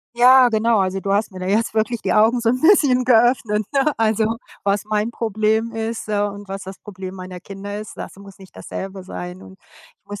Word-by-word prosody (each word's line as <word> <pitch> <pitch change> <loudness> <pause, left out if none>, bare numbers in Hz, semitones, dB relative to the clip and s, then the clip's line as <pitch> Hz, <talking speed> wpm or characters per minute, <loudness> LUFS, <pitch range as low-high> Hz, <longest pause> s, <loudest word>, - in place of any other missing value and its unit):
Ja, 250 +1 +7
genau. 225 0 +2
Also, 190 0 -1
du 195 - -4
hast 205 0 0
mir 185 - -9
da 185 - -5
jetzt 215 +4 +1
wirklich 220 +1 -1
die - - 0
Augen 225 +3 +4
so 230 -1 +2
'n 255 +1 -1
bisschen 290 -8 +4
geöffnet, 230 -3 +3
ne, 280 +2 +2
also, 220 0 +1 0.3
was 200 0 0
mein 215 +2 -1
Problem 220 0 -1
ist, 225 0 -4
ja, 205 -1 0
und 200 -1 -10
was 195 0 -6
das 190 0 -9
Problem 190 -2 -9
meiner 185 -1 -8
Kinder 200 +2 -7
ist, 215 - -10
das - - -8
muss 200 -1 -13
nicht 190 -1 -16
dasselbe 190 -1 -7
sein, 180 0 -7
und 190 - -14 0.4
ich - - -53
muss 205 0 -8
215 Hz, 220 wpm, -20 LUFS, 195-230 Hz, 0.4 s, Ja